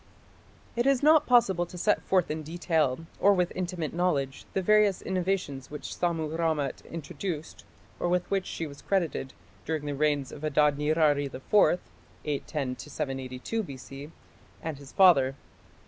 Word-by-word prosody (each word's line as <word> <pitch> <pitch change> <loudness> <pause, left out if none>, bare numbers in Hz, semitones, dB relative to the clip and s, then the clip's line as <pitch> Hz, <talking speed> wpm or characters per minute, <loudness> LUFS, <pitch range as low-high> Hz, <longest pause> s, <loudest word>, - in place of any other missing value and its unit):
It 240 +2 +1
is 275 -1 +3
not 305 0 +6
possible 195 -8 +4
to 180 - -10
set 210 +4 +2
forth 185 -4 +1
in 155 +1 -3
detail, 160 -2 0
or 200 0 +5
with 180 -1 +1
intimate 180 -4 -3
knowledge, 150 -6 -1
the 190 - +1
various 210 -1 +4
innovations 180 -8 -2
which 150 - -6
Sammu 160 -3 -1
rammat 160 -4 -1
introduced, 165 0 -6 0.3
or 175 - 0
with 180 0 +1
which 195 -1 0
she 165 - -4
was 140 -2 -10
credited, 170 -8 -1 0.3
during 155 -2 -3
the 145 - -2
reigns 145 -1 0
of 145 - -10
Adad 150 -1 +3
nirari 150 -1 +2
IV 180 +7 +3 0.5
(810 140 -3 -3
782 135 - -4
B.C.) 140 - -9 0.5
and 155 -3 -4
his 140 -1 -12
father. 140 -9 +5
160 Hz, 145 wpm, -28 LUFS, 145-185 Hz, 0.5 s, not